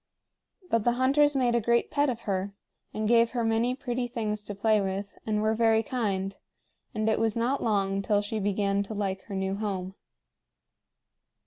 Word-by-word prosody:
But 230 -2 +2
the 240 - +3
hunters 280 +4 +3
made 250 -3 +2
a 235 - +2
great 235 +2 +1
pet 290 -1 +2
of 235 -2 -3
her, 200 -1 -2 0.4
and 215 0 -2
gave 235 +1 +4
her 235 - +1
many 225 +3 +1
pretty 250 -2 -3
things 215 -3 -3
to 205 - -5
play 215 +1 +2
with, 195 +1 -4
and 210 -1 0
were 215 0 +2
very 225 0 +3
kind; 195 -5 -2 0.6
and 215 0 0
it 220 - +2
was 225 -1 +1
not 250 +4 0
long 195 -3 +1
till 205 +1 +1
she 215 +1 -3
began 200 0 0
to 200 +2 -5
like 195 -2 -2
her 200 - -6
new 190 0 -1
home. 190 -3 -3
215 Hz, 185 wpm, -28 LUFS, 200-235 Hz, 0.6 s, gave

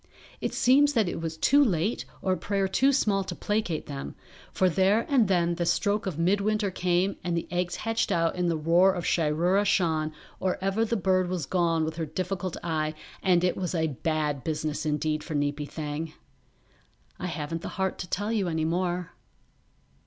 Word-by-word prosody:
It - - -2
seems 285 +3 +4
that 225 -7 +2
it 175 - -3
was 160 -1 -4
too 285 - +5
late 200 - 0 0.2
or 190 - +1
a - - -2
prayer 195 +3 0
too 265 +9 +3
small 205 -7 +2
to - - -6
placate 205 -7 -1
them, 140 -1 -6 0.4
for 185 - +2
there 190 +5 +3
and 255 -7 +3
then 175 -2 +2
the 175 0 -2
stroke 205 +3 +1
of 175 -6 -3
midwinter 200 +4 +1
came 185 +2 0
and 175 -1 -1
the 170 - -3
eggs 175 0 -1
hatched 225 -1 -1
out 165 -2 +1
in 180 -1 0
the 165 -2 +1
roar 170 +5 +4
of 175 -2 -4
Shiroora 170 +5 +2
Shan 160 -6 +1 0.3
or 185 -1 0
ever 195 +4 +1
the 230 +1 0
bird 185 -2 +2
was 180 -5 -2
gone 165 -1 +1
with 160 +1 -5
her 160 -2 -2
difficult 185 +3 -3
eye 155 -2 -1 0.3
and 180 -2 +3
it 180 - +2
was 180 -1 -3
a 160 -1 +1
bad 150 -1 -1
business 155 -1 -2
indeed 150 0 -1
for 160 - -5
Neepy 145 0 -1
Thang; 155 +1 -4 1.1
I 180 - -3
haven't 165 0 -4
the - - -5
heart 190 -1 -1
to 180 - -6
tell 205 +3 -1
you 210 -5 0
any 160 -2 -1
more. 175 +1 -1
175 Hz, 190 wpm, -27 LUFS, 160-195 Hz, 1.1 s, too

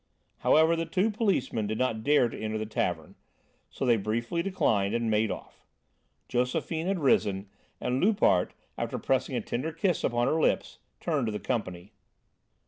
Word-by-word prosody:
However, 160 +2 +4
the 165 0 -2
two 200 +4 +1
policemen 195 - 0
did 110 +1 -2
not 115 -4 -1
dare 145 -3 +4
to - - -8
enter 110 0 -2
the 110 - -3
tavern, 85 -7 -2 0.6
so - - -4
they 120 -2 +4
briefly 115 - -1
declined 110 - +1
and 115 -1 0
made 110 0 +2
off. - - -8 0.6
Josephine 160 +7 -1
had 195 0 +1
risen, 105 - +2 0.3
and 125 +4 -1
Loupart, 195 - +3 0.2
after - - -2
pressing - - 0
a - - 0
tender 135 +7 -3
kiss 165 +1 0
upon 120 0 +1
her 160 +4 +1
lips, - - 0 0.2
turned 145 -8 0
to - - -1
the 105 - -3
company. 95 -6 -3
120 Hz, 165 wpm, -28 LUFS, 110-160 Hz, 0.6 s, However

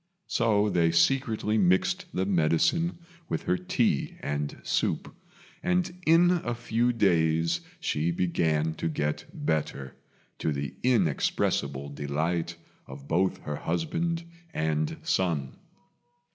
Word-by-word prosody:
So 105 -3 +2
they 85 -5 +3
secretly 110 +4 +2
mixed 95 -1 +2
the 95 - -1
medicine 95 - +2 0.3
with - - -2
her 180 - +1
tea 180 - 0
and 75 0 -3
soup, - - -1 0.5
and 180 0 +1
in 175 +2 +5
a 120 - -2
few 120 +1 +1
days 85 -6 +2 0.2
she 75 +3 0
began 80 -3 +1
to - - +1
get 75 -1 -2
better, 70 -4 -2 0.4
to 80 - 0
the 70 -1 -3
inexpressible 70 - +1
delight 80 +4 -2 0.3
of 70 +1 -10
both 95 +3 +1
her 75 -1 -3
husband 165 - -1 0.3
and 80 -1 0
son. 80 -8 0
85 Hz, 115 wpm, -28 LUFS, 75-120 Hz, 0.5 s, in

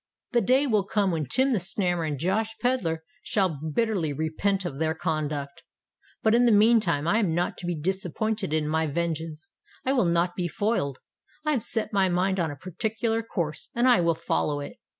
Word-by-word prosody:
The 240 -2 +3
day 260 +4 +3
will 215 -7 +2
come 195 -1 +1
when 155 -4 -2
Tim 260 - +2
the 220 - +2
Snammer 175 -2 0
and 145 -2 -2
Josh 210 +8 -1
Pedler 175 -11 0 0.2
shall 185 -8 0
bitterly 170 0 0
repent 160 +6 -1
of 145 -5 -5
their 160 0 0
conduct! 155 -4 -3 0.6
But 220 - +4
in 240 +1 +5
the - - +5
meantime 210 -8 +4
I 210 +6 +3
am 180 -8 +1
not 175 +1 0
to 175 - -6
be 175 - -1
disappointed 190 +3 -2
in 155 -1 0
my 160 +1 +1
vengeance—I 160 - -4
will 245 -9 +3
not 170 +1 +1
be 180 -2 -1
foiled: 160 - -1 0.5
I 305 - +2
have 255 -7 0
set 225 -2 -1
my 195 -2 +3
mind 185 +2 +1
on 165 -2 +1
a 145 - -6
particular 220 - -2
course—and 195 +4 -2
I 245 -8 +5
will 170 -1 +2
follow 150 -2 -1
it." 140 - -7
180 Hz, 190 wpm, -26 LUFS, 160-220 Hz, 0.6 s, in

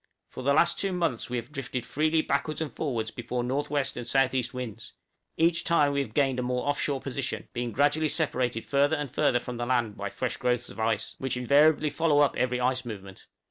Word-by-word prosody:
For - - -7
the 140 +2 +2
last 170 +2 +3
two 195 - 0
months 165 -12 -1
we 125 - -1
have 120 +4 -6
drifted 130 -4 -4
freely 155 +2 +1
backwards 140 +2 -1
and 160 -3 -3
forwards 115 -8 -2
before 120 0 -3
N.W. 140 +3 0
and 120 -1 -6
S.E. 130 -1 +3
winds; 125 -5 -7 0.4
each 170 +1 +3
time 150 -4 +3
we 140 0 +1
have 110 -6 -6
gained 135 -3 +2
a - - +1
more 125 +2 -2
off 145 0 +1
shore 140 -2 0
position, 135 +1 -4
being 120 -1 -2
gradually 145 +5 +2
separated 125 -8 -1
further 145 +2 +2
and 145 -4 -4
further 125 - +2
from 125 0 -6
the 120 - -2
land 120 -4 0
by 100 0 -3
fresh 130 +5 -3
growths 125 -1 0
of - - -11
ice, 110 -1 0
which 130 -2 -2
invariably 145 +4 +4
follow 145 0 +3
up 145 - +3
every 125 0 0
ice 130 +1 +1
movement. 100 -5 -9
130 Hz, 215 wpm, -28 LUFS, 120-145 Hz, 0.4 s, invariably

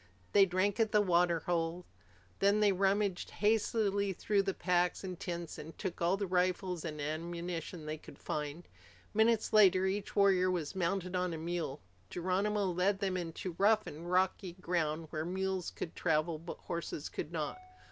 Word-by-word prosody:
They 200 -1 +7
drank 190 +4 +1
at 220 -1 +2
the 210 - +5
water 175 -4 +3
hole. 170 +1 -1 0.5
Then 200 +2 +4
they 210 -1 +5
rummaged 195 0 +1
hastily 205 -2 +1
through 200 +2 +1
the 195 -1 -1
packs 180 +1 +1
and 185 -2 -5
tents 170 -2 -5
and 160 +2 -9
took 190 -4 -4
all 175 +3 +3
the 200 - -1
rifles 180 -1 0
and 155 -2 -5
ammunition 170 +2 -4
they 155 0 -4
could 140 - -13
find. 150 +3 -4 0.5
Minutes 220 0 +3
later, 190 -3 +6
each 195 +1 -2
warrior 190 -2 +4
was 175 -2 -2
mounted 185 0 -1
on 180 -2 0
a - - -5
mule. 160 -3 -3 0.3
Geronimo 195 +4 0
led 185 +2 +1
them 195 -1 -1
into 175 0 -4
rough 215 +2 +4
and 165 +4 -7
rocky 185 0 +1
ground 165 -3 -1
where 155 0 -2
mules 190 +1 -2
could 165 - -6
travel 160 -1 +1
but 170 +2 -7
horses 170 -3 -4
could 150 - -5
not. 160 - -3
180 Hz, 165 wpm, -33 LUFS, 170-195 Hz, 0.5 s, They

